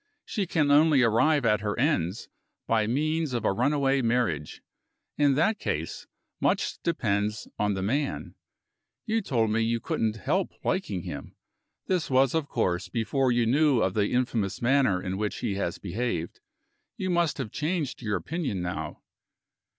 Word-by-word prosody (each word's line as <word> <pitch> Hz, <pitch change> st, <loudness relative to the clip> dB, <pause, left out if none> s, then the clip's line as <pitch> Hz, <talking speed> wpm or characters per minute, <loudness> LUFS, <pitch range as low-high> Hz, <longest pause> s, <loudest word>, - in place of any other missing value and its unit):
She 200 Hz, -5 st, -2 dB
can 150 Hz, -4 st, +2 dB
only 150 Hz, -2 st, +5 dB
arrive 130 Hz, +5 st, +3 dB
at 105 Hz, -2 st, +3 dB
her 105 Hz, -1 st, -2 dB
ends 115 Hz, -, 0 dB, 0.4 s
by 110 Hz, -2 st, +2 dB
means 155 Hz, +4 st, 0 dB
of 120 Hz, -, -2 dB
a -, -, +3 dB
runaway 135 Hz, +3 st, +2 dB
marriage. 115 Hz, -, -1 dB, 0.5 s
In 145 Hz, -2 st, +3 dB
that 205 Hz, +9 st, +2 dB
case, -, -, -3 dB, 0.3 s
much -, -, 0 dB
depends 105 Hz, -, -1 dB
on 105 Hz, -1 st, +1 dB
the 95 Hz, -, -3 dB
man. 140 Hz, +8 st, -1 dB, 0.7 s
You 225 Hz, 0 st, +1 dB
told 115 Hz, -, 0 dB
me 115 Hz, +1 st, +2 dB
you 115 Hz, +1 st, +1 dB
couldn't 110 Hz, 0 st, -1 dB
help 155 Hz, -, -1 dB
liking 105 Hz, -, -1 dB
him. -, -, -7 dB, 0.5 s
This 180 Hz, -3 st, 0 dB
was, 130 Hz, -1 st, +3 dB
of 160 Hz, -3 st, 0 dB
course, 90 Hz, -7 st, -1 dB
before 125 Hz, +3 st, +1 dB
you 120 Hz, -1 st, +2 dB
knew 140 Hz, 0 st, +3 dB
of 95 Hz, -, 0 dB
the 105 Hz, 0 st, +2 dB
infamous 120 Hz, -5 st, 0 dB
manner 125 Hz, -6 st, +3 dB
in 95 Hz, 0 st, -3 dB
which 105 Hz, -1 st, -2 dB
he 100 Hz, -, -1 dB
has 85 Hz, -3 st, -2 dB
behaved. 95 Hz, -3 st, -3 dB, 0.6 s
You 185 Hz, -4 st, -2 dB
must 170 Hz, -3 st, +1 dB
have 105 Hz, -, -4 dB
changed 155 Hz, -3 st, -2 dB
your 105 Hz, -3 st, -1 dB
opinion 155 Hz, -, -3 dB
now." 80 Hz, -3 st, -5 dB
120 Hz, 160 wpm, -27 LUFS, 105-150 Hz, 0.7 s, only